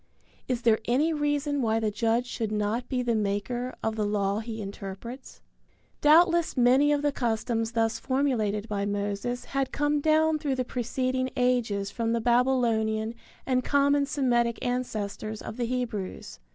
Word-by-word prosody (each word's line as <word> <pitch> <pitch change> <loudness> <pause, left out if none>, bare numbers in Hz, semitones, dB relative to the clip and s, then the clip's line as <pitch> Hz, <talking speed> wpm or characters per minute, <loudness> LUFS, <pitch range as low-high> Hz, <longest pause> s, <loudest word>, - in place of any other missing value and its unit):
Is 250 -2 -2
there 225 -2 +4
any 290 +7 +2
reason 290 -1 0
why 225 -2 +1
the 220 -1 0
judge 230 +3 +1
should 225 -3 -3
not 215 +3 -1
be 250 -2 0
the 240 -1 +1
maker 220 +4 -2
of 220 0 -1
the 215 - -1
law 205 0 0
he 225 0 -6
interprets? 200 +5 -8 0.6
Doubtless 335 +1 +4
many 260 +4 +5
of 290 0 +1
the 290 - +2
customs 225 -2 -1
thus 225 -1 +1
formulated 230 -7 0
by 205 -2 -2
Moses 205 +4 -2
had 275 -1 0
come 290 0 +1
down 315 +1 +3
through 285 -3 -1
the 255 -1 -1
preceding 255 +2 -1
ages 230 -6 +1
from 230 0 -1
the 235 - +1
Babylonian 230 -2 +1 0.3
and 255 -1 +1
common 280 +1 +2
Semitic 240 -5 +1
ancestors 220 -3 -3
of 220 - -7
the 245 - -1
Hebrews. 230 -6 -4
240 Hz, 155 wpm, -27 LUFS, 220-265 Hz, 0.6 s, many